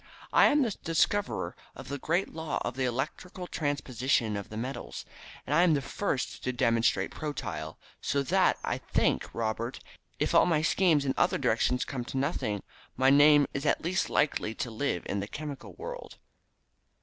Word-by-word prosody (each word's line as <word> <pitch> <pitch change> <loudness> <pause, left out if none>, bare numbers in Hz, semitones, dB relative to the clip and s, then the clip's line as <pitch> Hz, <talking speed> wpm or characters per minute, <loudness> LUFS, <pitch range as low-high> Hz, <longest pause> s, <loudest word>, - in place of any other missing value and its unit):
I - - +7
am 295 -1 +4
the 230 - 0
discoverer 200 +5 0 0.2
of - - -10
the 140 0 -4
great 170 +7 0
law 160 -2 -3
of 120 - -3
the 130 -1 0
electrical 155 +9 -3
transposition 130 -8 0
of 100 -1 -5
the 110 - -7
metals, 115 - -5 0.4
and 145 - -2
I 160 - +5
am 175 -3 +5
the 140 - 0
first 145 -1 -2
to 125 - 0
demonstrate 115 -2 +2
protyle, 150 -2 -5 0.2
so 140 0 0
that, 130 - +3
I - - -1
think, - - 0
Robert, 115 +2 -3 0.4
if - - 0
all - - +6
my 155 -3 +2
schemes 165 -4 +3
in 135 - +1
other - - +3
directions 125 0 +1
come 130 -3 -4
to 135 - -5
nothing, 130 - -1 0.3
my 130 +1 +5
name 145 +1 +7
is 140 - -3
at 150 - +1
least 185 +3 0
likely 125 -7 +1
to 120 - -4
live 110 -5 -1
in 100 - -2
the 100 - -4
chemical 145 +2 -7
world. - - -8
140 Hz, 175 wpm, -29 LUFS, 120-160 Hz, 0.4 s, I